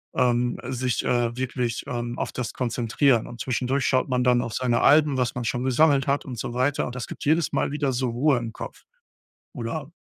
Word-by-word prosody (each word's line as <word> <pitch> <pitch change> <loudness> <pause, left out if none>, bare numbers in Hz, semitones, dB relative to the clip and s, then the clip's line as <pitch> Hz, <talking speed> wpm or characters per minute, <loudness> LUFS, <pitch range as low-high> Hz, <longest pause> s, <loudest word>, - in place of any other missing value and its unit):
ähm, 120 -1 +2
sich, 125 -1 -1
äh, 120 -1 +1
wirklich, 125 -2 -2
ähm, 120 -2 -4
auf - - -2
das 125 -3 -4
konzentrieren 120 +1 +1
und 120 - -9
zwischendurch 130 +2 0
schaut 130 -1 +2
man 125 -1 +1
dann 125 -1 +4
auf 115 - -5
seine 120 -2 +1
Alben, 145 -2 +5
was 125 -2 0
man 125 - -3
schon 120 +2 -1
gesammelt 135 +1 +3
hat 140 +1 +1
und 125 -4 -6
so 120 - -4
weiter, 130 +3 +1
und 120 - -6
das 125 - -5
gibt - - -8
jedes 160 +2 +2
Mal - - 0
wieder 145 -2 0
so 125 0 0
Ruhe 135 +3 +2
im 115 -1 -5
Kopf. - - -9 0.7
Oder 140 +3 -5
125 Hz, 210 wpm, -25 LUFS, 120-135 Hz, 0.7 s, Alben